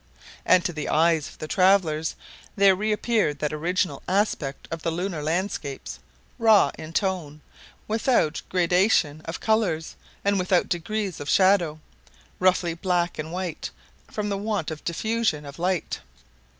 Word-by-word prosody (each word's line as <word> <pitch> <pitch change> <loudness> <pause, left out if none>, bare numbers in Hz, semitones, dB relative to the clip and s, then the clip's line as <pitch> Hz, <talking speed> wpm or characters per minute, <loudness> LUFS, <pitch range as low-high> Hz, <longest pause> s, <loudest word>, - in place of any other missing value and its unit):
And 180 - +5
to 175 - -1
the 150 -2 -4
eyes 160 -1 +3
of - - -16
the 155 - -6
travelers 175 -4 +2 0.4
there 200 -1 +6
reappeared 210 -5 0
that 150 +1 -2
original 175 +4 -1
aspect 180 -8 -1
of 165 -1 -4
the 165 - -1
lunar 175 -1 -3
landscapes, 160 -3 -3 0.4
raw 220 -3 +5
in 155 0 -9
tone, 170 -6 -2 0.5
without 220 - +1
gradation 180 -4 +2
of 165 +2 -5
colors, 200 -8 0 0.3
and 200 -1 +2
without 180 -1 +2
degrees 190 +2 -2
of 145 - -5
shadow, 185 -5 +3 0.6
roughly 180 -2 +2
black 175 0 -1
and 155 +1 -4
white, 180 -2 -4 0.4
from 210 -1 -3
the 200 -1 -2
want 205 -6 -2
of 155 - -7
diffusion 210 -4 -1
of 140 +2 -10
light. 180 0 -1
180 Hz, 140 wpm, -25 LUFS, 155-200 Hz, 0.6 s, there